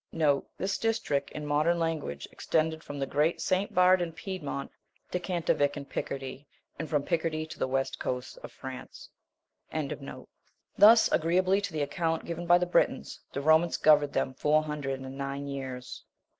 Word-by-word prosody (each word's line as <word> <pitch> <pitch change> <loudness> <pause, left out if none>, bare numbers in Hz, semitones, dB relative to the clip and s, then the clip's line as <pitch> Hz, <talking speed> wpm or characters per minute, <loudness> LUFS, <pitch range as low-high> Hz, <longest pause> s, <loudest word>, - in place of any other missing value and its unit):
* 140 - -7
This 195 +1 -1
district, 220 -12 0
in 150 - -6
modern 150 +4 +2
language, 160 - -2
extended 160 0 0
from 145 - -7
the 135 - -1
great 150 +5 +1
St. 190 +2 0
Bernard 180 0 +5
in 170 -2 -3
Piedmont 160 -7 -5 0.4
to 180 - 0
Cantavic 170 -5 0
in 140 - -6
Picardy, 135 0 -5 0.3
and 160 - -4
from 150 -3 +1
Picardy 160 -1 -1
to 155 - -11
the - - +1
western 135 +1 -1
coast 125 0 -4
of - - -9
France. 130 -1 -9 0.6
28. - - -3 0.8
Thus, 220 +3 +8
aggreeably 185 +4 +3
to 200 - -4
the 155 -2 -1
account 165 +2 -1
given 170 0 -5
by 175 0 +7
the 180 - 0
Britons, 175 - +1
the 140 - -3
Romans 160 +3 +4
governed 150 -2 +5
them 130 - 0
four 150 +3 +2
hundred 145 -3 -3
and 130 0 -8
nine 140 +1 -3
years. 130 -2 -6
155 Hz, 170 wpm, -29 LUFS, 140-175 Hz, 0.8 s, Thus